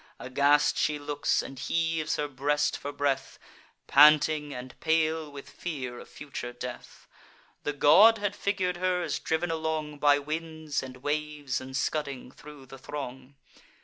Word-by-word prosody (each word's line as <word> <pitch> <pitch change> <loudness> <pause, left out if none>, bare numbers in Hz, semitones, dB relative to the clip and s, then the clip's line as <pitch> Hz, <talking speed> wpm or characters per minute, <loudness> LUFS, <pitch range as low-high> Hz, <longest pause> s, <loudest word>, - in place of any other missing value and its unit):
Aghast 140 +3 +2
she 150 - +1
looks, 145 0 0
and 135 - -9
heaves 160 +2 0
her 150 - -2
breast 145 +2 0
for 145 - -5
breath, 140 -1 -1 0.5
Panting, 150 +1 +5
and 125 -1 -7
pale 160 -1 +1
with 140 -1 -10
fear 130 -8 -6
of - - -12
future 140 -4 -7
death. 120 0 -9 0.5
The 145 - -2
god 195 +11 +7
had 205 -1 -2
figur'd 190 -3 -1
her 180 0 0
as - - -2
driv'n 165 +2 -1
along 160 -2 -3
By 145 -1 +5
winds 155 0 -4
and 130 -1 -10
waves, 150 -2 -2
and 130 0 -5
scudding 140 -3 -3
thro' 145 -1 -13
the 135 +1 -12
throng. 135 -1 -7
150 Hz, 145 wpm, -28 LUFS, 135-160 Hz, 0.5 s, god